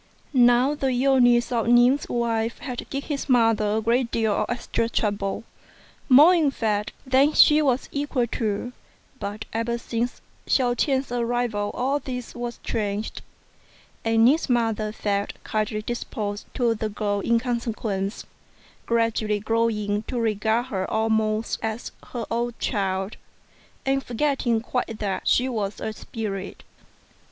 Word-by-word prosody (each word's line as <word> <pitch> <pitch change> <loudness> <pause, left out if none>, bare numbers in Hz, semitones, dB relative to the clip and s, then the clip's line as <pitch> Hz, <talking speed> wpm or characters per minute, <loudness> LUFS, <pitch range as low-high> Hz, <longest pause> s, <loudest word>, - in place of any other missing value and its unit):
Now 245 +2 +5
the 285 -2 -1
illness 250 -2 +3
of 230 -2 0
Ning's 245 +4 +4
wife 230 -1 -1
had 250 -3 -6
given 275 0 -4
his 290 -1 -3
mother 225 -4 +3
a - - 0
great 235 +2 +1
deal 220 -3 +1
of - - -1
extra 235 -1 -1
trouble 205 -2 -1 0.7
more, 295 +7 +8
in 320 -5 +3
fact, 215 -5 -1
than 270 +3 +4
she 300 0 +6
was 265 -3 +1
equal 280 -3 0
to; 230 +1 -3 0.5
but 205 +2 -5
ever 230 +1 -1
since 235 +1 -3 0.3
Hsiao 250 -2 +3
ch'ien's 265 +1 0
arrival 235 -3 -1
all 270 +3 0
this 250 -3 -6
was 240 -1 -5
changed, 210 -1 -3 0.8
and 225 0 +4
Ning's 290 +4 +3
mother 225 -3 +1
felt 205 -1 -2
kindly 215 0 -2
disposed 210 -3 -4
to 240 -2 +2
the 220 0 -3
girl 205 -1 -1
in 230 +3 +2
consequence, 225 -4 -3 0.6
gradually 225 -2 +1
growing 210 -1 0
to 250 - -2
regard 220 +1 +1
her 190 -1 -1
almost 220 0 0
as 220 +1 -4 0.2
her 240 - -5
own 235 +1 -1
child, 195 -2 -2 0.7
and 270 0 +1
forgetting 245 -3 0
quite 235 -2 -3
that 200 -3 -3
she 255 - +3
was 215 -5 -3
a 220 - -3
spirit. 205 -3 -6
230 Hz, 140 wpm, -24 LUFS, 215-245 Hz, 0.8 s, more